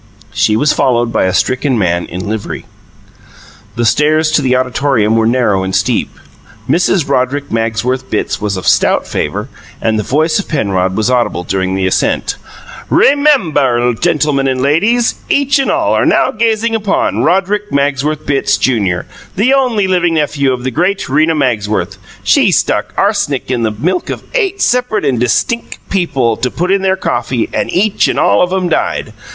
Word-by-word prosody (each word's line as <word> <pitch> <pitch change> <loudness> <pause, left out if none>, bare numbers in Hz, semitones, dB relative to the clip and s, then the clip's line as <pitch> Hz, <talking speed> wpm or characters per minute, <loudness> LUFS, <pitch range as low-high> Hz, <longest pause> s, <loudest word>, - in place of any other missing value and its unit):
She 105 - +2
was 150 +7 +2
followed 120 -2 +1
by - - +1
a 95 - +1
stricken 130 - 0
man 85 -4 0
in 90 +4 -6
livery. 110 0 -5 1.1
The 120 - -1
stairs 155 +5 +2
to 155 - +2
the 130 -2 +1
auditorium 125 -3 +1
were 110 0 +2
narrow 115 -5 +1
and 95 0 -3
steep; - - 0 0.6
Mrs. 175 -2 +1
Roderick 140 +1 -1
Magsworth 115 +3 -1
Bitts 110 - -2
was 100 -2 -2
of 95 - -6
a - - -3
stout - - +2
favour; - - -3 0.3
and 110 -1 0
the - - -1
voice 155 - +1
of 200 - -5
Penrod 95 - -1
was 110 +3 +1
audible 120 -8 0
during 95 0 -2
the 95 0 -1
ascent. 95 - 0 0.5
"RE - - +4
MEM 285 - +2
BUR, 125 -4 +1
gentilmun 150 -1 0
and 130 -1 -1
lay 140 +4 +2
deeze, 235 +4 0
each 280 0 +2
and 275 - 0
all - - +1
are - - +2
now - - +2
gazing 225 0 0
upon 210 -3 0
Roderick 195 +5 0
Magsworth 140 +2 -1
Bitts, 140 -2 +1
Junior, 100 -8 0 0.3
the 235 +8 +2
only 250 -7 +1
living 175 -3 +1
nephew 145 -3 0
of 125 -1 -3
the 130 - -2
great 180 +9 -1
Rena 155 +4 +2
Magsworth. 105 - -1 0.2
She - - +3
stuck - - 0
ars'nic 200 - 0
in 125 -2 -1
the 110 - +1
milk 165 - -2
of - - -5
eight 400 -6 0
separate 245 -7 0
and 130 -4 0
distinck 230 - -1
people 135 - 0
to 125 - -1
put 180 +7 -2
in 195 0 +2
their 190 0 +1
coffee 120 -7 -2
and - - -2
each 200 +3 +1
and - - -1
all 100 - +3
of 180 - +1
'em 185 -1 0
died. 165 - -2
140 Hz, 180 wpm, -13 LUFS, 115-185 Hz, 1.1 s, RE